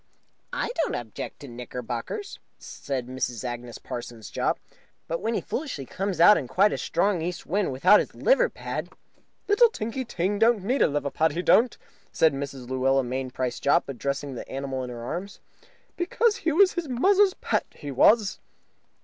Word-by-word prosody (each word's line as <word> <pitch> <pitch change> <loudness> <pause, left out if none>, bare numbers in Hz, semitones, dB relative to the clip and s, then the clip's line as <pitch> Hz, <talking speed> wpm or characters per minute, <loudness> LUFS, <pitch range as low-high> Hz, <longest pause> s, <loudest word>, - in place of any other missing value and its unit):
"I - - -2
don't - - -1
object 115 -3 -6
to 140 - -8
the 120 - -10
knickerbockers," 125 - -6 0.2
said 135 -3 -5
Mrs. 125 -2 -3
Agnes 120 -1 -5
Parsons 120 -3 -8
Jopp, - - 0 0.5
"but 165 - -3
when 225 +1 -1
he - - 0
foolishly 260 - -4
comes 195 +5 -3
out 205 +5 +8
in 130 - -6
quite 200 +10 +3
a - - -2
strong 185 0 +1
east 175 +1 -4
wind 195 0 0
without 180 +11 +6
his - - -4
liver - - +3
pad - - -5 0.3
" - - -42
"Little 440 +3 +6
Tinky 230 - -4
Ting 200 -3 -2
don't 225 -3 +4
need 250 +7 0
no - - +6
liver 145 -1 -2
pad, 160 -1 +1
he 175 +3 -2
don't," 235 +5 +4 0.3
said 160 -2 +3
Mrs. 135 -2 -6
Luella 130 +1 +2
Mainprice 130 0 -3
Jopp, 145 +5 +3
addressing 140 +1 -3
the 125 - -8
animal 135 -1 -3
in 125 - -5
her 120 -1 -7
arms, 185 +10 -5 0.6
"because 415 +5 +1
he 325 - 0
was 375 +4 +5
his 345 -3 -3
muzzer's 385 +10 +4
pet, - - -1
he 145 - -7
was." 205 - +4
160 Hz, 180 wpm, -26 LUFS, -, 0.6 s, out